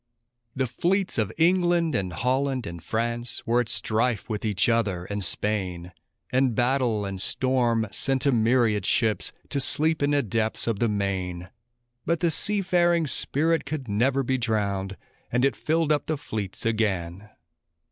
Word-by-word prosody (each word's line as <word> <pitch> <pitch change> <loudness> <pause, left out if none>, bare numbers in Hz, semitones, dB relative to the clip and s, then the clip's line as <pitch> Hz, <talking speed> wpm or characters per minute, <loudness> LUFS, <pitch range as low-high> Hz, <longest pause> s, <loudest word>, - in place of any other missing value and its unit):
The 130 -1 0
fleets 180 - 0
of 110 - 0
England 175 -1 +3
and 95 -2 -1
Holland 130 - -1
and 85 0 -7
France 115 +2 -2
were 120 +1 +2
at 115 - -5
strife 115 -1 0
with 110 -3 -4
each 105 -5 +1
other 105 -7 0
and 100 +1 -3
Spain; 90 -3 +1 0.4
And 130 -2 +2
battle 120 -4 +1
and 95 -1 -3
storm 120 -3 +1
sent 135 +6 +1
a 140 - +4
myriad 115 -3 +2
ships 110 -1 +1 0.2
to 140 - -1
sleep 155 +4 +1
in 145 - +2
the 145 -1 +2
depths 110 +1 -2
of 115 -4 -1
the 120 - +2
main; 95 -3 -3 0.5
But 170 -1 0
the 170 -2 +2
seafaring 175 -2 +1
spirit 160 +3 +1
could 150 -5 -5
never 130 +7 +1
be 130 +1 0
drowned, 100 -4 -1 0.3
and 125 +2 +2
it 135 - +1
filled 160 0 0
up 145 -2 0
the 155 - -1
fleets 110 -10 -5
again. 100 -3 -1
120 Hz, 155 wpm, -25 LUFS, 105-140 Hz, 0.5 s, a